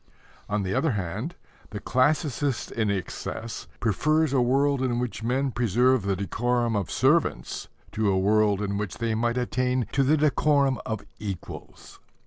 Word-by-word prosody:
On 105 -1 0
the 95 0 -2
other 160 +2 +1
hand, 105 - -4 0.3
the 105 - -6
classicist 140 0 0
in 110 -3 0
excess 100 +3 -4
prefers 155 +7 +1
a 130 - +3
world 135 +2 +2
in 125 -2 0
which 120 -2 -3
men 130 +4 0
preserve 125 +2 +2
the 100 0 0
decorum 120 +4 0
of 100 -3 -1
servants - - +1 0.2
to 110 -1 0
a 95 - +2
world 105 +1 +2
in 100 0 -2
which 95 -7 -4
they 115 -1 -1
might 120 +2 0
attain 125 0 0
to 135 - +2
the 145 +4 +3
decorum 140 -3 +2
of 110 -2 -4
equals. 100 -4 -8
120 Hz, 155 wpm, -26 LUFS, 105-130 Hz, 0.3 s, a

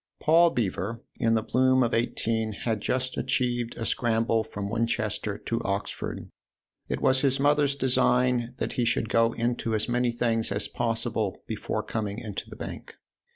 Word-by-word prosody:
Paul 170 +2 +5
Beever, 115 - -2 0.2
in 115 0 +3
the 110 - +1
bloom 130 +2 +3
of 120 - 0
eighteen, 110 -1 0
had 110 +1 -2
just 130 +3 -1
achieved 125 -2 -1
a 115 - -3
scramble 115 -1 +1
from 100 -2 -5
Win 115 +3 0
chester 105 -2 -2
to 115 - -3
Oxford: 100 +1 -3 0.6
it - - -2
was 130 0 +3
his 135 -1 +2
mother's 145 0 +3
design 125 -2 +2
that - - -2
he 125 - 0
should 115 -1 0
go 115 0 +3
into 115 -1 -1
as 110 - 0
many 120 0 +1
things 115 -2 0
as 100 +1 +1
possible 115 -4 -2
before - - -3
coming 105 -2 -3
into 105 -5 -6
the - - -9
Bank. - - -8
115 Hz, 165 wpm, -27 LUFS, 110-125 Hz, 0.6 s, Paul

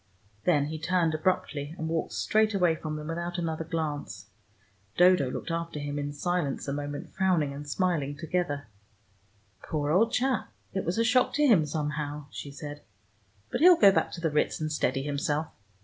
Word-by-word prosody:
Then 150 -5 +3
he 155 +1 -5
turned 165 0 +1
abruptly, 155 -2 -1
and 160 - -3
walked 165 0 -2
straight 215 0 +2
away 180 -4 +3
from 155 -1 -5
them 150 0 -6
without 170 +1 -3
another 165 -2 -2
glance. 160 -3 -4 0.7
Dodo 180 -7 +5
looked 145 - -5
after 165 -1 -3
him 145 0 -3
in 145 0 -3
silence 145 -1 -2
a 140 - -1
moment, 145 0 -5
frowning 175 -7 +1
and 145 +1 -8
smiling 150 -5 0
together. 145 -4 -2 0.9
"Poor 150 -2 -2
old 225 +7 +4
chap: 255 -2 0 0.2
it 190 - -2
was 175 +4 -1
a 230 - +3
shock 250 +2 +3
to 295 +1 +3
him 190 - +5
somehow," 150 -1 -3
she 145 - -7
said. 145 +1 -8 0.7
"But - - -2
he'll 355 +1 +8
go 200 -7 +8
back - - +1
to 170 - -6
the 165 -2 0
Ritz 150 - +1
and 155 -1 -2
steady 135 -3 0
himself. 145 +2 -1
160 Hz, 180 wpm, -28 LUFS, 145-180 Hz, 0.9 s, he'll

